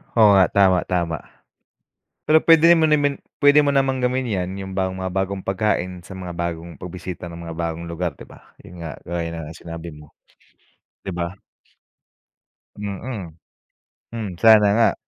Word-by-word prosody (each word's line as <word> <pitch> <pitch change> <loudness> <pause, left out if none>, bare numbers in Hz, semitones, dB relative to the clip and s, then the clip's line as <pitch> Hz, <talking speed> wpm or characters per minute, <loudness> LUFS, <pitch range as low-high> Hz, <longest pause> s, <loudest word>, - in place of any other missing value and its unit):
Oo 110 -3 +7
nga, 95 - +6
tama-tama. 90 -4 +2 1.1
Pero 160 +1 +5
puwede 165 +1 +7
mo 160 - +4
nemen 145 -2 +2 0.2
puwede 145 +1 +7
mo 140 - +3
namang 135 -1 +2
gawin 125 +1 0
yan 95 -1 -2
yung 95 0 -7
bagong 95 0 -1
mga 95 - -3
bagong 95 +1 -2
pagkain 95 -3 -1
sa 95 - -9
mga 90 -1 -6
bagong 85 -2 -5
pagbisita 90 0 -7
ng 85 0 -9
mga 80 - -6
bagong 85 0 -3
lugar 85 0 -3
'di - - -12
ba? - - -18
Yun 90 - -13
nga, 80 -2 -6
gaya 85 0 -3
nga 80 - -6
ng 80 - -12
sinabi 85 0 -8
mo, 75 0 -13 0.9
'di 95 - -6
ba? 85 +2 -4 1.4
Mm. 100 -4 -6 0.7
Hmm 110 -6 -5
sana 110 -1 +6
nga. 115 0 +3
95 Hz, 160 wpm, -22 LUFS, 85-110 Hz, 1.4 s, Oo